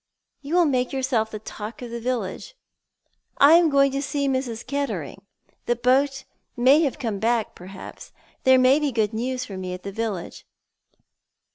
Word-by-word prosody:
You 295 +4 -3
will 355 -1 +5
make 255 -4 0
yourself 255 -5 0
the 215 - -6
talk 215 +2 -8
of 240 - -7
the 235 - -4
village." 245 - -4 0.8
"I 285 +3 +7
am 335 -1 +6
going 275 -1 +4
to 275 +1 -2
see 285 0 -1
Mrs. 260 -4 -2
Kettering. 280 +1 -4 0.5
The 240 - +2
boat 265 +3 +1 0.3
may 265 +6 +5
have 290 -3 0
come 225 -8 -3
back, 230 0 0
perhaps. 185 +2 -11 0.3
There 260 0 +6
may 255 +3 +5
be 295 -2 0
good 220 -3 0
news 255 +3 -2
for 195 - -8
me 185 -1 -4
at 180 - -12
the 200 - -5
village." 205 -4 -4
255 Hz, 170 wpm, -24 LUFS, 220-275 Hz, 0.8 s, I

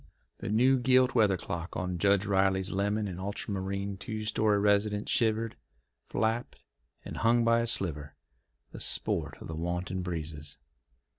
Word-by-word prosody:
The - - -5
new 125 +5 +4
gilt 130 +1 +4
weather 105 -5 +3
cock 85 +1 -5
on 90 -1 -3
Judge 100 +1 +3
Riley's 95 -1 +2
lemon 105 +2 0
and 90 -2 -6
ultramarine 100 0 -4
two 110 +2 -5
story 110 -1 +2
residence 105 0 +1
shivered, 115 -1 +1 0.5
flapped, 115 +2 -2 0.4
and - - -6
hung 115 +1 +3
by 115 0 +4
a 115 - 0
splinter, 75 -10 -1 0.6
the - - -9
sport - - 0
of - - -9
the 80 - -5
wanton 90 +3 -3
breezes. 80 -5 -5
100 Hz, 145 wpm, -30 LUFS, 90-110 Hz, 0.6 s, new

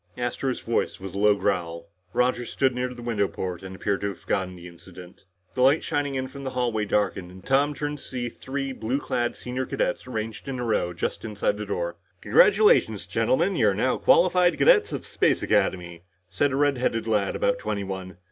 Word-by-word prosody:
Astro's 125 +1 -2
voice 115 - -1
was 95 -1 -7
a 100 - -4
low 105 0 +5
growl. 85 -5 -2 0.2
Roger 125 +3 +1
stood 130 +2 0
near 125 0 -2
the 120 -1 -9
window 110 -4 0
port 90 -3 -5
and 95 0 -8
appeared 100 +1 -1
to 100 - -1
have 100 -3 -6
forgotten 95 -1 -2
the 90 0 -11
incident. 90 +1 -14 0.3
The 130 - -2
light 135 +5 +4
shining 145 -3 -1
in 130 0 -2
from 140 +1 -10
the 135 - -2
hallway 120 -4 -1
darkened, 100 -3 -1
and 95 +1 -14
Tom 140 +2 +2
turned 145 0 -4
to - - -12
see 125 -2 -4
three 135 +3 -4
blue 130 +1 -2
clad 120 -4 -1
senior 125 +1 -4
cadets - - -2
arranged 110 -2 -5
in 135 -1 -3
a 125 - -3
row 105 -6 0
just 85 - -4
inside 105 -1 -1
the 105 0 -5
door. 85 -3 -3 0.2
"Congratulations, 475 -2 +4
gentlemen. - - +1
You're - - +3
now - - +1
qualified 180 - +4
cadets - - +5
of - - -5
Space - - +1
Academy," 85 -2 0 0.3
said 140 +10 +1
a - - -1
redheaded 130 -5 +1
lad 105 -3 0
about - - +1
twenty 100 - -3
one. 95 -2 -6
115 Hz, 200 wpm, -25 LUFS, 95-135 Hz, 0.3 s, low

